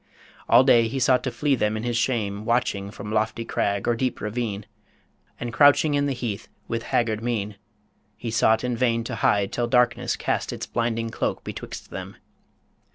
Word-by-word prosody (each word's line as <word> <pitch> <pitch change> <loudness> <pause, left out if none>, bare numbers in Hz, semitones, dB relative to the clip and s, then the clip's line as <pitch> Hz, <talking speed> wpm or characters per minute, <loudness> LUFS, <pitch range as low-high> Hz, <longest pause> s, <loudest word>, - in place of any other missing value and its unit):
All 120 +3 +7
day 120 -4 +5
he 130 +4 -4
sought 125 0 +4
to 130 - -1
flee 140 +5 0
them 110 -4 +1
in 110 - -5
his 120 -1 -1
shame, 110 -4 -1
Watching 115 -4 0
from 100 +1 -8
lofty 110 +1 -1
crag 100 -2 -1
or 120 - +3
deep 130 +1 -2
ravine, 105 -2 -3 0.7
And 120 -1 -4
crouching 145 +2 +5
in 145 0 +2
the 140 - 0
heath, 115 -4 -4 0.2
with 115 -1 -2
haggard 110 -2 0
mien 105 -4 -2 0.6
He 115 - -5
sought 110 0 +3
in 125 -1 -1
vain 115 -1 +1
to - - -5
hide 100 -1 +2
till 120 -1 0
darkness 125 -1 +2
cast - - -2
Its - - -5
blinding 115 -1 -2
cloak - - -2
betwixt - - -8
them. - - -7
115 Hz, 180 wpm, -24 LUFS, 110-125 Hz, 0.7 s, All